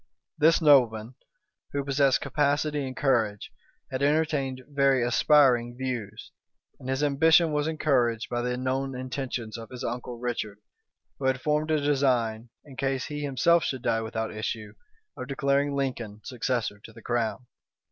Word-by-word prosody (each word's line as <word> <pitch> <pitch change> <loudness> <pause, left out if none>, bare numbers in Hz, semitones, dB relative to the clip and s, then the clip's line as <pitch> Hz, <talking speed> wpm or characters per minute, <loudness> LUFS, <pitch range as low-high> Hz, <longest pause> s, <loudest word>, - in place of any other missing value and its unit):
This 160 +2 +4
nobleman, 120 -6 +4 0.6
who 140 0 -1
possessed 140 -1 +2
capacity 145 -1 0
and 130 - -8
courage, 115 -7 0 0.4
had 130 - -3
entertained 140 -3 0
very 140 -3 +2
aspiring 120 -1 +3
views; 120 -6 -5 0.5
and 130 - -8
his 135 +2 0
ambition 160 +3 +4
was 150 0 0
encouraged 125 -8 +1
by 120 0 -2
the 125 0 -2
known 130 +1 -2
intentions 125 -3 -5
of 115 - -10
his 125 -1 -8
uncle 125 0 -4
Richard, 115 -4 -4 0.6
who 135 - -4
had 130 -1 +2
formed 150 +3 0
a 155 -1 +2
design, 125 -6 +1 0.2
in 135 -3 -13
case 135 -1 -1
he 150 0 -5
himself 145 +4 +3
should 130 -3 -3
die 115 0 +1
without 110 0 -4
issue, 110 -1 -4 0.4
of 130 - -7
declaring 140 +1 0
Lincoln 120 -6 -3
successor 120 -4 -2
to - - -11
the 115 0 -15
crown. 120 0 -2
130 Hz, 150 wpm, -27 LUFS, 120-145 Hz, 0.6 s, This